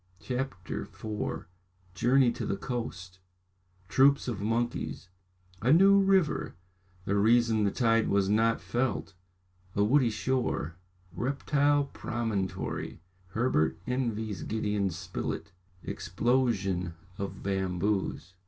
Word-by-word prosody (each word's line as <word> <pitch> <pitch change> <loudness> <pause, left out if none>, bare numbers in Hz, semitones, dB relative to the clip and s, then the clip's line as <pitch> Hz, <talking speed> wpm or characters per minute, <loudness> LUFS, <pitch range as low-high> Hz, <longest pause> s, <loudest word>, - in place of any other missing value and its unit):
CHAPTER 125 - -4
IV 105 +10 -5 0.5
Journey 125 +2 +4
to - - -5
the 100 - -1
Coast 100 -7 -5 0.7
Troops 135 +7 +4
of 110 -5 -3
Monkeys 115 -3 -2 0.5
A 120 +4 +3
new 195 +5 +7
River 195 -4 +2 0.5
The 100 - 0
Reason 110 +1 +4
the - - +3
Tide 115 +1 +2
was 100 -1 +2
not 115 +3 +3
felt 120 -5 -1 0.6
A 100 - +3
woody 125 +3 +4
Shore 110 - -1 0.4
Reptile 145 +2 +1
Promontory 110 -11 -3 0.2
Herbert 95 -7 +1
envies 115 -6 -2
Gideon 105 -2 -1
Spilett 85 -1 -5 0.3
Explosion 95 -4 0 0.2
of 100 0 -5
Bamboos. 95 -1 -1
110 Hz, 100 wpm, -29 LUFS, 95-130 Hz, 0.7 s, new